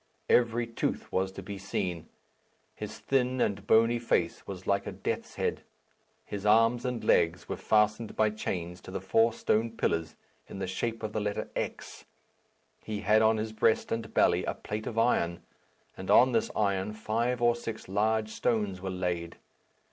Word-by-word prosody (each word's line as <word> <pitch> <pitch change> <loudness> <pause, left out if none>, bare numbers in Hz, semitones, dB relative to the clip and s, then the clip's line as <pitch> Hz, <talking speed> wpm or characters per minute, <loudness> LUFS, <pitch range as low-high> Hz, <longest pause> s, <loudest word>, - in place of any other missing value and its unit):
Every 120 0 +3
tooth 115 0 -3
was 95 0 0
to 95 - -8
be 100 +1 -7
seen. 90 -5 -3 0.6
His - - -7
thin 130 -1 0
and 100 -3 0
bony 115 +1 +4
face 90 -7 0
was 95 -1 -7
like 100 0 0
a - - -3
death's - - -4
head. - - -1 0.6
His 100 -1 -5
arms 115 +3 +4
and 125 -2 -2
legs 85 0 +2
were - - -3
fastened 110 +1 +1
by 110 -1 +3
chains 90 -4 -4
to - - -11
the - - -3
four 115 +1 +3
stone 115 0 +1
pillars 80 -1 -1 0.3
in - - -8
the 95 - -2
shape 115 +5 -3
of 105 -1 -3
the 110 - -1
letter 105 0 -3
X. - - -5 0.8
He 105 -1 -4
had 110 +2 +4
on 110 0 +4
his 110 0 -3
breast 110 +1 +2
and 115 -1 -3
belly - - +3
a - - -2
plate 105 +1 -5
of 115 - -5
iron, 85 -7 +1 0.5
and - - -8
on 130 +1 +7
this 115 -2 +1
iron 100 -1 0
five 115 +3 -1
or 120 0 +4
six 115 -1 -6
large 110 +3 +1
stones 105 -4 -1
were 95 - -3
laid. 90 -2 -3
110 Hz, 175 wpm, -29 LUFS, 95-115 Hz, 0.8 s, on